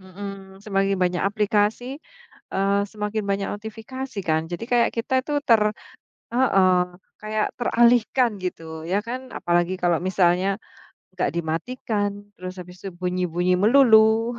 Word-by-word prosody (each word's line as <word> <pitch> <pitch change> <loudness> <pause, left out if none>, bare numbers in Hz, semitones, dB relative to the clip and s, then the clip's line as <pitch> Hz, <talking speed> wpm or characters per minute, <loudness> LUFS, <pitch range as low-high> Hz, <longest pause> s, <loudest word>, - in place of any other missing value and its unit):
hmm, 190 0 -9
semakin 195 -1 0
banyak 180 -1 +1
aplikasi, 210 +5 0 0.6
eee, 200 +1 +2
semakin 210 0 -3
banyak 195 0 0
notifikasi 225 +3 -7
kan 160 0 0
jadi 175 +6 -5
kayak 240 -1 +4
kita 260 +3 +1
itu 295 0 0
ter 225 -4 +5 0.7
heeh, 195 -8 +4 0.5
kayak 215 0 0
teralihkan 240 -1 +3
gitu, 160 -3 -5
ya 195 +3 +1
kan. 255 +2 -6
Apalagi 175 +1 0
kalau 175 -2 +2
misalnya 185 +1 +2 0.6
nggak 180 - +1
dimatikan, 205 +6 -2 0.3
terus 185 +1 -7
habis 180 0 -11
itu 195 - -4
bunyi-bunyi 180 0 0
melulu, 225 +1 +5
200 Hz, 125 wpm, -23 LUFS, 180-225 Hz, 0.7 s, ter